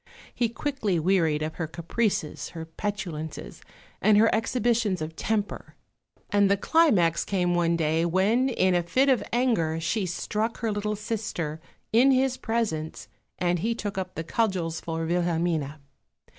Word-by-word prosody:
He 235 -2 0
quickly 230 - -1
wearied 160 -3 +2
of 155 +1 -4
her 165 - -2
caprices, 170 +1 -2
her 165 -1 -5
petulances, 160 - -5 0.4
and 210 +1 +5
her 225 +2 +5
exhibitions 225 -3 +1
of 155 +1 -5
temper; 210 +1 -3 0.6
and 205 -1 +4
the 200 - +3
climax 200 - +3
came 180 -3 0
one 170 -1 +2
day 160 0 +1
when 205 +9 +2
in 185 -7 +2
a 175 - +3
fit 255 +12 +2
of 260 -3 +3
anger 225 -11 +1
she 185 +5 -1
struck 215 +6 -2
her 225 -2 0
little 210 +1 -2
sister, 205 -8 -4 0.3
in 245 +4 +6
his 265 -1 +3
presence, 215 -9 -2 0.3
and 175 -1 +1
he 230 +6 0
took 205 -3 -4
up 185 -1 -4
the 160 - -3
cudgels 180 -5 -1
for 165 0 -3
Wilhelmine. 165 -3 0
190 Hz, 150 wpm, -26 LUFS, 165-225 Hz, 0.6 s, in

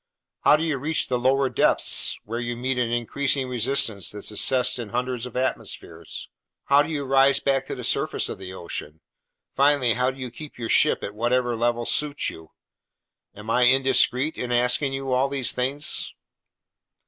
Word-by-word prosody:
How - - +5
do 155 - -1
you 155 -5 -1
reach 155 +4 -1
the 125 -1 0
lower 135 +2 +2
depths, - - +2
where 115 +3 -4
you 120 0 -4
meet 125 +1 -2
an 120 -2 0
increasing 130 +3 -1
resistance 115 - 0
that's 105 +1 -4
assessed 125 +4 +1
in 115 -3 -6
hundreds 125 0 -3
of 125 - -8
atmospheres? 130 +1 -4 0.4
How 140 +1 +5
do 145 - -3
you 150 -3 -2
rise 135 +1 +4
back 135 -1 0
to - - -4
the - - -8
surface - - 0
of - - -6
the 95 -1 -8
ocean? 85 -3 -7 0.5
Finally, 140 -4 +3
how 125 +2 +1
do 130 - -7
you 130 -2 -6
keep 150 +3 -11
your 115 -2 -5
ship - - +4
at 100 - -5
whatever 120 +2 0
level 120 +1 0
suits 145 +2 0
you? 80 -1 -13 0.9
Am 105 +2 -6
I 125 +1 +4
indiscreet 135 +2 +2
in 125 -1 -3
asking 125 +3 +1
you 135 -1 -3
all 130 +2 +2
these 135 -4 0
things?" 135 +4 0
125 Hz, 180 wpm, -24 LUFS, 120-135 Hz, 0.9 s, How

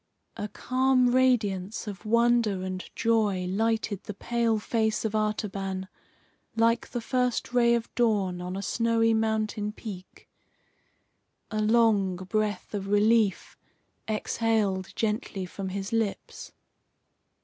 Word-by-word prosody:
A 210 - -4
calm 255 +2 +2
radiance 225 -6 +1
of 205 0 -7
wonder 235 -4 +3
and 185 0 -4
joy 210 -5 +1
lighted 220 0 -1
the 210 - -6
pale 235 +1 0
face 220 +1 0
of 220 - -1
Artaban 195 -3 -2 0.7
like 230 +1 +2
the 240 - -4
first 250 0 -1
ray 235 -1 +4
of 230 -1 -2
dawn, 205 -7 +1
on 180 +1 -5
a 195 - -4
snowy 230 0 +2
mountain 220 -1 0
peak. 200 -4 -10 1.2
A 215 0 -1
long 215 -4 +3
breath 205 +4 -2
of 200 -1 -3
relief 205 0 +2 0.5
exhaled 215 -3 0
gently 210 -3 -2
from 190 +1 -6
his 195 +2 -4
lips. 225 -3 -3
215 Hz, 115 wpm, -27 LUFS, 195-230 Hz, 1.2 s, ray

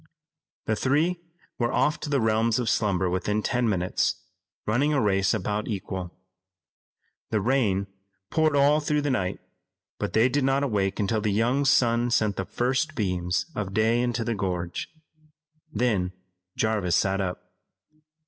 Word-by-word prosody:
The 110 - +1
three 155 +9 +1 0.4
were 120 -1 +1
off 150 +2 +1
to - - -5
the 140 -2 +2
realms 110 0 +2
of 120 -3 0
slumber 95 -4 +1
within 105 +4 -1
ten 125 -2 +1
minutes, 90 -3 0 0.5
running 135 +8 +1
a - - +3
race 100 -4 +2
about 105 0 -2
equal. 95 -4 -4 1.2
The 110 - +1
rain 105 -5 +1 0.5
poured 155 -2 +2
all 145 +2 +4
through 150 -1 0
the 145 - 0
night, 95 -8 -1 0.6
but - - -3
they 110 +3 +5
did 140 +2 0
not 135 +1 +2
awake 100 -7 0
until 105 +1 0
the 105 -1 0
young 120 +7 +1
sun 120 -2 +3
sent 110 -4 +1
the 95 - -3
first 130 - -1
beams 90 -4 -1
of 100 -4 -4
day 110 +2 +3
into 120 -1 -1
the 115 +1 -1
gorge. 90 -4 -3 0.8
Then 105 - 0 0.4
Jarvis 105 -6 +1
sat 95 +1 +1
up. 90 -1 -5
110 Hz, 150 wpm, -26 LUFS, 95-130 Hz, 1.2 s, they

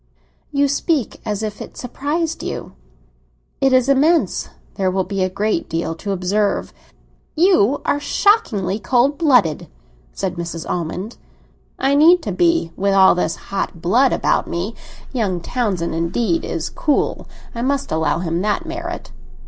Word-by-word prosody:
"You 285 0 +2
speak 285 - -1
as 210 0 -2
if 210 -1 -5
it - - -9
surprised 305 +6 -2
you." - - -5 0.9
"It 270 - +3
is 255 -1 +4
immense; 300 +5 +2 0.2
there 190 -2 0
will 190 +1 0
be 195 +1 -3
a 185 - +1
great 215 - -1
deal 165 0 -2
to 200 +5 -5
observe." 195 +2 0 0.6
"You 305 - +3
are 290 - +1
shockingly 220 - +1
cold 260 +5 +2
blooded!" 250 - +3 0.4
said 185 -2 -4
Mrs. 170 -1 -5
Almond. 180 +6 -4 0.6
"I 270 +1 +1
need 325 +4 +6
to - - -3
be 335 - +2
with 200 0 +1
all 190 -1 +7
this 180 -2 -1
hot 195 -3 -4
blood 240 +11 +3
about - - +1
me. 175 +6 -3 0.4
Young 200 -8 0
Townsend 190 -4 -2
indeed 185 - 0
is - - -3
cool; 295 -3 0 0.3
I 235 - -4
must 275 +2 -1
allow 160 0 +1
him 170 0 -2
that 210 - -1
merit." 340 +2 -6
215 Hz, 150 wpm, -19 LUFS, 185-285 Hz, 0.9 s, all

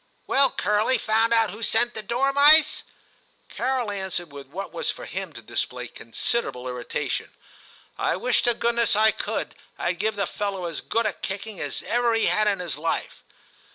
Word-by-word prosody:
'Well, 275 -1 +4
Curly; 210 +4 +1
found 225 +1 +2
out 225 -3 +3
who 210 +4 -10
sent 240 +2 +1
the 220 - -5
dormice 280 +7 +5 0.3
?* - - -38
Carol 255 -4 0
answered 190 -4 -4
with 140 -1 -9
what 190 +8 -6
was 485 - -2
for - - -4
him - - -5
to - - -10
display - - -3
considerable 130 - -3
irritation, 125 -1 -3 0.3
* - - -22 0.3
I - - +1
wish 245 +7 +1
to 240 -1 +3
goodness 235 -2 +2
I 220 +1 +5
could; - - -3 0.3
Td 175 0 -1
give 215 +2 0
the 200 -1 0
fellow 195 -1 -3
as 165 -2 -4
good 230 0 0
a 215 - +1
kicking 200 +1 -5
as 145 -2 -4
ever 240 -1 +2
he 225 - +2
had 215 0 +3
in 200 -1 +2
his 170 -6 -5
life.' 165 +1 -2
215 Hz, 185 wpm, -25 LUFS, 185-235 Hz, 0.3 s, dormice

